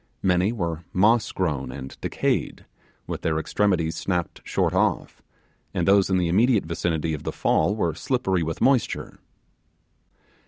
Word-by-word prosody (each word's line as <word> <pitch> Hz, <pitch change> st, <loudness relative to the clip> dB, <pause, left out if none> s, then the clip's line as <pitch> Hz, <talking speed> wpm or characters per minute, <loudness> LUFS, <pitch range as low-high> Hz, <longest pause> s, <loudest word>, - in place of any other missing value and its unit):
Many 90 Hz, +2 st, +2 dB
were 85 Hz, -7 st, -3 dB
moss 110 Hz, +5 st, +3 dB
grown 75 Hz, -8 st, -2 dB
and 65 Hz, -1 st, -8 dB
decayed, -, -, -1 dB, 0.4 s
with -, -, -5 dB
their 80 Hz, -1 st, 0 dB
extremities 85 Hz, 0 st, 0 dB
snapped 90 Hz, -3 st, -2 dB
short -, -, 0 dB
off, -, -, 0 dB, 0.5 s
and 85 Hz, 0 st, 0 dB
those 100 Hz, 0 st, +4 dB
in 95 Hz, -, +2 dB
the 90 Hz, -2 st, +1 dB
immediate 110 Hz, +4 st, +3 dB
vicinity 80 Hz, -1 st, -1 dB
of 75 Hz, -, -4 dB
the -, -, -3 dB
fall 90 Hz, +7 st, +1 dB
were 85 Hz, -7 st, 0 dB
slippery 95 Hz, -, 0 dB
with 80 Hz, 0 st, -3 dB
moisture. 130 Hz, -2 st, +1 dB
90 Hz, 145 wpm, -24 LUFS, 80-100 Hz, 0.5 s, those